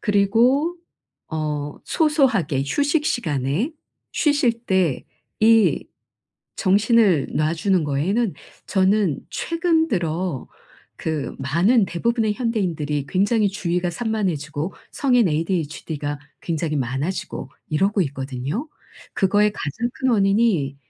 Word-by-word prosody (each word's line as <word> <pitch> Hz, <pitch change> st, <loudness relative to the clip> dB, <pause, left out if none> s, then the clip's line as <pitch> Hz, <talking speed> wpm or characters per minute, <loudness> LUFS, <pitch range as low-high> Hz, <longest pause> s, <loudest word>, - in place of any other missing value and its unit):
그리고 235 Hz, -, +2 dB, 0.5 s
어 150 Hz, -2 st, -3 dB
소소하게 265 Hz, -, +2 dB
휴식 290 Hz, -, +1 dB
시간에 155 Hz, -, -1 dB, 0.4 s
쉬실 290 Hz, -5 st, +2 dB
때 185 Hz, -, +1 dB, 0.4 s
이 225 Hz, 0 st, +4 dB, 0.7 s
정신을 205 Hz, -, +3 dB
놔주는 165 Hz, +3 st, +1 dB
거에는 180 Hz, +10 st, 0 dB, 0.3 s
저는 190 Hz, -4 st, +2 dB
최근 335 Hz, -1 st, +1 dB
들어 170 Hz, -, -2 dB, 0.5 s
그 155 Hz, -3 st, -3 dB
많은 175 Hz, -, +3 dB
대부분의 220 Hz, +5 st, 0 dB
현대인들이 175 Hz, -, -1 dB
굉장히 205 Hz, +3 st, +2 dB
주의가 180 Hz, -2 st, -1 dB
산만해지고 175 Hz, -7 st, -2 dB, 0.2 s
성인 245 Hz, -7 st, +3 dB
ADHD가 155 Hz, -3 st, -2 dB, 0.2 s
굉장히 160 Hz, -2 st, -2 dB
많아지고 135 Hz, +2 st, -3 dB, 0.2 s
이러고 195 Hz, +7 st, +1 dB
있거든요. 135 Hz, -, -4 dB, 0.5 s
그거의 205 Hz, +2 st, +3 dB
가장 220 Hz, -, -3 dB
큰 260 Hz, -, -1 dB
원인이 195 Hz, -, +2 dB
190 Hz, 245 characters per minute, -22 LUFS, 150-230 Hz, 0.7 s, 이